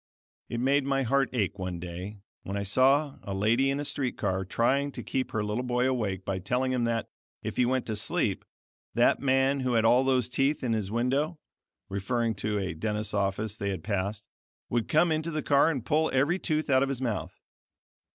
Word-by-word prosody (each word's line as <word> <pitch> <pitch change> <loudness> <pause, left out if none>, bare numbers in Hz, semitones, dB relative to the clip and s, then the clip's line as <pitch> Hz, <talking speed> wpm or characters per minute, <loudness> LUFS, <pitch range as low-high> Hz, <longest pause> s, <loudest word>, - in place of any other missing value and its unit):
It 120 - -3
made 135 +3 +3
my 135 0 +1
heart 135 +1 +2
ache 100 -5 -1
one 90 -2 -4
day 90 +4 -6 0.2
when 100 +1 -4
I 100 - -2
saw 135 +8 +3
a 100 -2 -5
lady 115 +7 +2
in 140 +1 0
a 145 - -2
street 135 -3 -2
car 95 -2 -1
trying 135 +8 +1
to - - -6
keep 130 -1 -2
her 110 - -1
little 105 +3 -1
boy 125 0 +1
awake 105 -8 -1
by 95 -1 -2
telling 125 +7 0
him 125 -2 +1
that, 115 -1 -1 0.4
if - - -4
he 125 - +3
went 130 0 0
to 110 - -2
sleep, - - 0 0.5
that - - +4
man 135 0 +2
who 130 -1 0
had 115 -1 +3
all 125 +3 +5
those 130 -3 +2
teeth 135 +4 0
in 120 -3 +1
his 105 -3 -1
window 135 +8 0 0.5
(referring 115 +4 -1
to 105 +1 -1
a 95 -3 -2
dentist's 105 +5 -2
office 100 +1 -1
they 100 -3 -3
had 95 -5 -4
passed) 100 0 -2 0.4
would 120 -2 0
come 160 +2 +3
into 155 +1 0
the 155 -2 -3
car 140 +2 +4
and 135 -8 -3
pull 155 +5 +2
every 145 +8 +2
tooth 155 -3 0
out 130 -2 +4
of 135 - +1
his 135 -3 -2
mouth. 115 -7 -3
120 Hz, 210 wpm, -28 LUFS, 105-135 Hz, 0.5 s, all